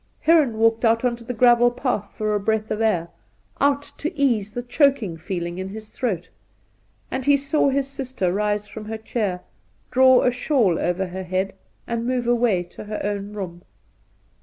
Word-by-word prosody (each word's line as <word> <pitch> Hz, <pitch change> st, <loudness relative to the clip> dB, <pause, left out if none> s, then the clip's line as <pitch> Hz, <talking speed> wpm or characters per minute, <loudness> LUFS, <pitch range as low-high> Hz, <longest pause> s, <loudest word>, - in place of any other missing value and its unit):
Heron 305 Hz, -9 st, +4 dB
walked 225 Hz, +1 st, +3 dB
out 230 Hz, +1 st, +3 dB
on 240 Hz, -1 st, +1 dB
to 235 Hz, -, -13 dB
the 235 Hz, -, -5 dB
gravel 240 Hz, +1 st, +5 dB
path 245 Hz, -5 st, -3 dB
for 215 Hz, -1 st, -1 dB
a 210 Hz, -, +1 dB
breath 220 Hz, +1 st, -1 dB
of 215 Hz, -, -1 dB
air 180 Hz, -7 st, +1 dB, 0.3 s
— -, -, -21 dB
out 285 Hz, 0 st, +3 dB, 0.2 s
to 315 Hz, -, -2 dB
ease 230 Hz, -8 st, +1 dB
the 245 Hz, +3 st, -4 dB
choking 245 Hz, -, +2 dB
feeling 175 Hz, +1 st, -4 dB
in 190 Hz, 0 st, -4 dB
his 215 Hz, +1 st, -9 dB
throat; 195 Hz, -10 st, -3 dB, 0.8 s
and 260 Hz, -, -2 dB
he 285 Hz, +1 st, +5 dB
saw 280 Hz, +1 st, +1 dB
his 275 Hz, 0 st, 0 dB
sister 260 Hz, -9 st, -2 dB
rise 210 Hz, +1 st, 0 dB
from 215 Hz, 0 st, -8 dB
her 220 Hz, +1 st, -4 dB
chair, 210 Hz, -5 st, -2 dB, 0.5 s
draw 260 Hz, 0 st, +6 dB
a 250 Hz, -, +3 dB
shawl 245 Hz, -, +1 dB
over 180 Hz, +2 st, 0 dB
her 185 Hz, +1 st, -6 dB
head, 185 Hz, +2 st, -2 dB, 0.3 s
and 235 Hz, 0 st, -3 dB
move 250 Hz, -1 st, 0 dB
away 235 Hz, -6 st, +2 dB
to 175 Hz, -, -11 dB
her 210 Hz, 0 st, -4 dB
own 205 Hz, 0 st, -3 dB
room. 180 Hz, -4 st, -6 dB
220 Hz, 185 wpm, -23 LUFS, 195-250 Hz, 0.8 s, draw